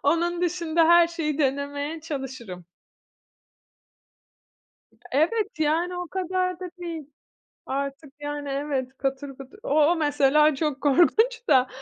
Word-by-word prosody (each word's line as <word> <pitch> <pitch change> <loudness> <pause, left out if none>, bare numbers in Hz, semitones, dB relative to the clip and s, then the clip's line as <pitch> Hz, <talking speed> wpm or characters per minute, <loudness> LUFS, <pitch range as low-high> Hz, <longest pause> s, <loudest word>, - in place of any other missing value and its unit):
onun 340 +4 +1
dışında 335 -2 +1
her 345 0 +7
şeyi 320 -3 -3
denemeye 285 +2 -1
çalışırım. 260 - -6 2.5
Evet, 405 - +1
yani, 330 +4 +1
o 355 0 -4
kadar 365 0 -2
da 365 -1 -6
değil 335 -3 -5 0.6
artık, 275 +1 -4
yani, 290 -1 -5
evet, 275 -2 -3
katır 270 +1 -2
kutur, 270 +8 -12
o - - -5 0.2
o - - +2
mesela 300 -1 +3
çok 285 -1 -2
korkunç 435 - +3
da, 255 -1 +5
300 Hz, 115 wpm, -25 LUFS, 275-345 Hz, 2.5 s, her